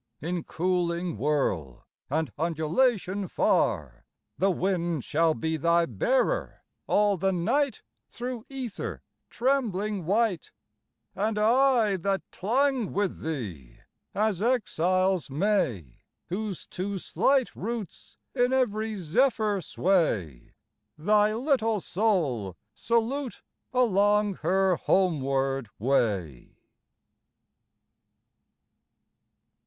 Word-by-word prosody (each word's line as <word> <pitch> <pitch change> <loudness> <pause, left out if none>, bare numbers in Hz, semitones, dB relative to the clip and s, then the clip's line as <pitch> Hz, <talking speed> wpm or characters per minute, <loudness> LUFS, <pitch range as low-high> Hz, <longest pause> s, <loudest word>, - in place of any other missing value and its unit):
In 170 +2 -3
cooling 175 -1 -1
whirl 95 - -1 0.2
and 155 -2 -1
undulation 185 - 0
far 70 - 0 0.3
The 195 - +3
wind 175 -5 -1
shall 160 +1 +2
be 160 0 -2
thy 170 +2 +3
bearer 260 - 0 0.2
all 205 -1 +3
the 190 +2 +1
night 235 +9 0 0.3
Thro' 245 -1 -5
ether 260 -6 -5 0.3
trembling 215 - -1
white: 205 -3 +1 0.6
And 210 +2 -1
I 230 -2 +3
that 195 +2 -1
clung 255 +2 0
with 200 -2 -1
thee, 95 - -5 0.4
as 210 -3 0
exiles 185 - +1
may 145 - -1 0.3
Whose 195 0 -4
too 195 +2 -4
slight 265 +7 +1
roots 225 -1 -6 0.2
in 245 -1 +2
every 220 -4 0
zephyr 210 - +1
sway, 135 - 0 0.4
Thy 210 +6 +3
little 225 -4 +1
soul 155 - 0 0.2
salute 235 - -1 0.3
along 210 -4 +2
her 185 +2 +2
homeward 135 - +1
way! 100 - -1
190 Hz, 90 wpm, -27 LUFS, 160-220 Hz, 0.6 s, The